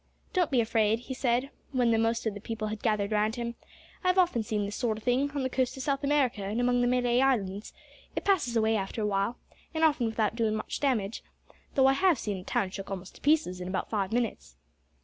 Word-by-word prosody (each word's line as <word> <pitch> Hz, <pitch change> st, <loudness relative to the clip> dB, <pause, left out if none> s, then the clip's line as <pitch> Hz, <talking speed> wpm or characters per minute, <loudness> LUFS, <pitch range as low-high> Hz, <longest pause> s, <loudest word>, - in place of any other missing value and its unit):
"Don't 360 Hz, -5 st, +2 dB
be 255 Hz, -4 st, +3 dB
afraid," 225 Hz, 0 st, +2 dB
he 260 Hz, -, -6 dB
said, 255 Hz, +1 st, 0 dB, 0.2 s
when 245 Hz, -3 st, +3 dB
the 225 Hz, -, +3 dB
most 230 Hz, +1 st, +1 dB
of 220 Hz, -, 0 dB
the 205 Hz, -, -8 dB
people 220 Hz, -1 st, -4 dB
had 215 Hz, 0 st, -5 dB
gathered 210 Hz, -2 st, 0 dB
round 215 Hz, +1 st, +1 dB
him. 235 Hz, -1 st, -3 dB, 0.5 s
"I've 365 Hz, 0 st, +2 dB
often 350 Hz, -10 st, +3 dB
seen 210 Hz, -1 st, -1 dB
this 205 Hz, 0 st, -5 dB
sort 230 Hz, -4 st, -1 dB
o' -, -, -7 dB
thing, 250 Hz, +5 st, +1 dB
on 280 Hz, -2 st, -1 dB
the -, -, +1 dB
coast 260 Hz, 0 st, -1 dB
o' -, -, -7 dB
South 275 Hz, +1 st, -1 dB
America 280 Hz, -7 st, +2 dB
and 205 Hz, +4 st, -2 dB
among 245 Hz, 0 st, +2 dB
the 245 Hz, -, +3 dB
Malay 245 Hz, 0 st, +2 dB
Islands. 210 Hz, -7 st, 0 dB, 0.4 s
It -, -, -3 dB
passes 340 Hz, -12 st, +2 dB
away 220 Hz, 0 st, +3 dB
after 210 Hz, +2 st, -2 dB
a -, -, +1 dB
while, 200 Hz, +3 st, 0 dB, 0.4 s
and 320 Hz, -, 0 dB
often 295 Hz, -7 st, +3 dB
without 220 Hz, -1 st, 0 dB
doin' 225 Hz, -2 st, +1 dB
much 215 Hz, -, -4 dB
damage 230 Hz, -7 st, 0 dB, 0.5 s
though 265 Hz, -, +5 dB
I 270 Hz, -, +6 dB
have 355 Hz, +2 st, +3 dB
seen 205 Hz, -2 st, -3 dB
a 185 Hz, -, -8 dB
town 190 Hz, 0 st, -1 dB
shook 195 Hz, 0 st, -7 dB
almost 190 Hz, -1 st, -6 dB
to -, -, -21 dB
pieces 290 Hz, -12 st, +2 dB
in 180 Hz, -, -4 dB
about 185 Hz, +1 st, -3 dB
five 200 Hz, -3 st, -1 dB
minutes." 220 Hz, -, -2 dB
230 Hz, 235 wpm, -29 LUFS, 210-260 Hz, 0.5 s, I